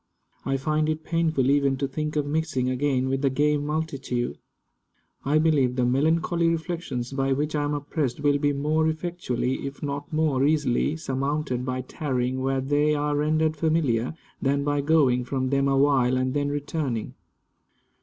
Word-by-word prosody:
I 135 0 0
find 155 +3 0
it 155 0 -2
painful 160 -6 +1
even 140 -1 +2
to 140 +1 -1
think 150 +3 -4
of 150 -1 +1
mixing 145 -4 -1
again 130 0 0
with 135 0 -1
the 140 - +3
gay 150 +3 +2
multitude. 145 -5 -3 0.8
I 145 +3 +2
believe 150 -6 +2
the 125 -1 +1
melancholy 160 +6 +2
reflections 160 -7 -3
by 135 0 +1
which 150 +3 -1
I 145 -1 0
am 145 0 -1
oppressed 145 -3 -2
will 145 -1 +2
be 145 0 +2
more 155 +3 +1
effectually, 160 -6 -2
if 140 +2 -9
not 145 0 -4
more 155 -4 +1
easily, 145 0 +1
surmounted 135 -3 -2
by 130 0 -2
tarrying 130 -1 -2
where 135 0 0
they 145 +3 +2
are 145 0 0
rendered 155 +1 +1
familiar, 150 -6 0 0.3
than 140 0 +1
by 145 0 0
going 140 -5 +3
from 130 +1 -2
them 140 0 +2
awhile 135 -2 +3
and 130 0 0
then 145 -1 0
returning. 145 -5 -3
145 Hz, 165 wpm, -25 LUFS, 130-155 Hz, 0.8 s, the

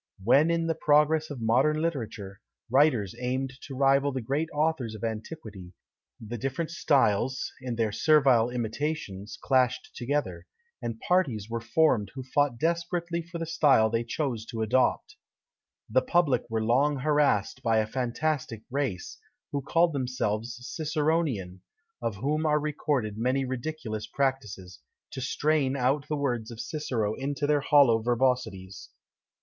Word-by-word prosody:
When 140 +9 +5
in 170 0 +1
the 165 - +1
progress 155 0 +3
of 140 -5 -7
modern 140 +7 +3
literature, 115 - -4 0.3
writers 130 - +3
aimed 130 +1 -2
to 135 - -7
rival 140 +1 +3
the 130 - -3
great 140 +7 -2
authors 150 -7 -1
of 110 - -10
antiquity, 110 - -6 0.5
the 115 +1 -6
different 135 +7 -3
styles, 130 -5 +1
in 125 -2 -4
their 115 -2 0
servile 135 -4 +4
imitations, 120 -4 -4
clashed 130 -2 +1
together; 145 +4 -2 0.3
and 115 -1 -4
parties 125 - 0
were 115 0 -2
formed 115 -4 +2
who 130 - -5
fought 135 -1 +1
desperately 170 +2 -1
for 170 +1 -8
the 165 - -3
style 140 -9 +3
they 115 0 0
chose 120 -2 -3
to 115 -2 -3
adopt. 125 +4 +1 0.7
The 130 +4 +3
public 140 -5 +1
were 110 -1 -1
long 135 +6 +2
harassed 145 -7 +1
by 115 -1 +2
a 110 - +2
fantastic 125 0 -2
race, 130 -10 -3 0.3
who 140 - -2
called 165 +4 +2
themselves 125 -4 -2
Ciceronian, 150 - -1 0.4
of 115 -3 -2
whom 150 +9 -1
are 150 0 +3
recorded 145 -8 -2
many 130 +3 +1
ridiculous 130 -4 -4
practices, 105 - -3 0.3
to 130 - -6
strain 140 0 +1
out 135 +3 +1
the 150 - -2
words 120 -6 -2
of 115 -2 -9
Cicero 115 -9 -2
into 140 +4 -3
their 145 0 +2
hollow 140 -6 +5
verbosities. 115 -6 -1
130 Hz, 145 wpm, -27 LUFS, 115-150 Hz, 0.7 s, When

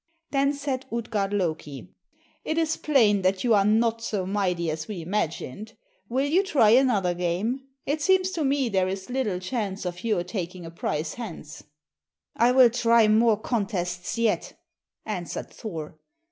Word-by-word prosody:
Then 275 0 +2
said 275 -2 -4
Utgard 220 -4 -2
Loki 160 -8 -3 0.5
"It 315 - -2
is 320 -1 +1
plain 225 -9 +3
that 185 0 +1
you 240 -2 +3
are 200 -2 +5
not 225 +2 +2
so 205 -5 -2
mighty 180 -4 0
as 155 0 -5
we 210 -4 -5
imagined. 190 +2 -3 0.3
Will 260 +4 +1
you 325 +7 +3
try 275 - +3
another 225 -8 +3
game? 190 +10 -2 0.2
It 295 +2 -1
seems 375 +3 +3
to 330 -4 -2
me 275 -1 +1
there 190 -4 +1
is 190 +4 -5
little 245 -8 -1
chance 195 -1 -3
of 175 0 -5
your 215 -6 +1
taking 180 -1 -5
a 165 - -8
prize 155 -2 -3
hence." 185 -10 -8 0.7
"I 235 +2 +4
will 250 -2 +6
try 230 -2 +4
more 215 0 +4
contests 190 -6 -2
yet," 230 -2 0 0.5
answered 180 -5 -5
Thor. 160 -8 -7
215 Hz, 160 wpm, -26 LUFS, 180-250 Hz, 0.7 s, will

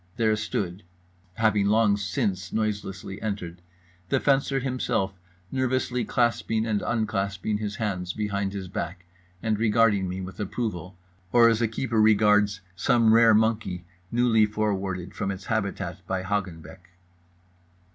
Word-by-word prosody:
There 110 -2 +3
stood 100 -3 -3 0.5
(having 105 -2 +2
long 105 -1 +4
since 95 -1 -2
noiselessly 100 -2 -3
entered) 90 -5 -4 0.5
The - - +2
Fencer 135 -1 +2
Himself, 125 -7 -1 0.4
nervously 130 -2 0
clasping 115 -1 +1
and 105 -3 0
unclasping 105 -2 -1
his 105 -1 -3
hands 95 -5 -2
behind 100 -1 -2
his 95 -2 -5
back 90 0 -5 0.4
and 110 -2 0
regarding 105 -4 +3
me 90 +1 -4
with 95 -1 -8
approval, 100 -4 -4 0.3
or 120 -1 +6
as 115 0 +1
a 115 - +3
keeper 115 0 0
regards 105 -2 +4
some 110 +3 +3
rare 115 -1 +6
monkey 105 -5 0 0.3
newly 115 -3 +3
forwarded 100 -4 -2
from 95 - -3
its 95 0 -5
habitat 110 -4 -2
by 95 -1 -2
Hagenbeck. 95 -3 -4
105 Hz, 130 wpm, -26 LUFS, 95-115 Hz, 0.5 s, or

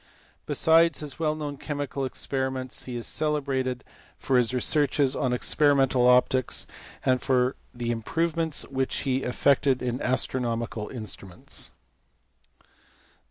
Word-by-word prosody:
Besides 165 -1 +4
his 150 0 -6
well 155 -2 +1
known 145 -2 -5
chemical 145 -1 -3
experiments, 130 -1 -3
he 125 - -6
is 120 - -3
celebrated 135 -4 -1 0.3
for 135 - -1
his 120 -1 +2
researches 140 +1 +2
on 130 -3 0
experimental 135 -1 +3
optics, 125 0 +3 0.4
and 130 -1 +2
for 130 0 +2 0.2
the 120 -1 -3
improvements 160 +7 0
which 130 -1 -1
he 130 -2 0
effected 135 +1 +2
in 125 0 -2
astronomical 120 -3 -1
instruments. 105 -6 -5
130 Hz, 115 wpm, -26 LUFS, 125-145 Hz, 0.4 s, Besides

